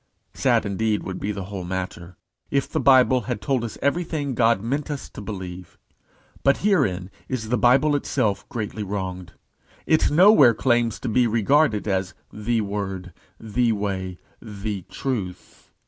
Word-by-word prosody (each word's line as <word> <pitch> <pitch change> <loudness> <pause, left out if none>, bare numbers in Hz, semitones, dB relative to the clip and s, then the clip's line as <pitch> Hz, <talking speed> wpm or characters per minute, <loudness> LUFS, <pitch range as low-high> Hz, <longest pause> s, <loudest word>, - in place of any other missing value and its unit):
Sad, - - +2
indeed, 105 +1 0
would 95 - -5
the 100 -1 -3
whole 95 -1 -6
matter 90 -1 -5 0.3
be, 140 - 0
if 140 - 0
the - - -2
Bible 130 -1 +5
had - - -1
told 130 0 -1
us 115 - -5
everything 145 -2 -1
God 115 -3 +3
meant 135 +8 -3
us 145 -2 -5
to - - -9
believe. 95 -4 -7 0.6
But 140 - +3
herein 100 - +1 0.2
is 110 -4 -3
the 125 - +2
Bible 135 +5 +4
itself 125 -7 -1
greatly 110 -1 -4
wronged. 95 -3 -5 0.5
It 160 - +3
nowhere 155 - +7
lays - - -16
claim 120 -1 +3
to 115 - -7
be 120 +2 +3
regarded 115 +1 +2
as 95 -2 -1 0.2
the 110 +2 -1
Word, 95 -3 -4 0.3
the 115 +1 +1
Way, 95 -3 -3 0.2
the 105 -2 -5
Truth. 100 -10 -5
110 Hz, 155 wpm, -23 LUFS, 95-130 Hz, 0.6 s, nowhere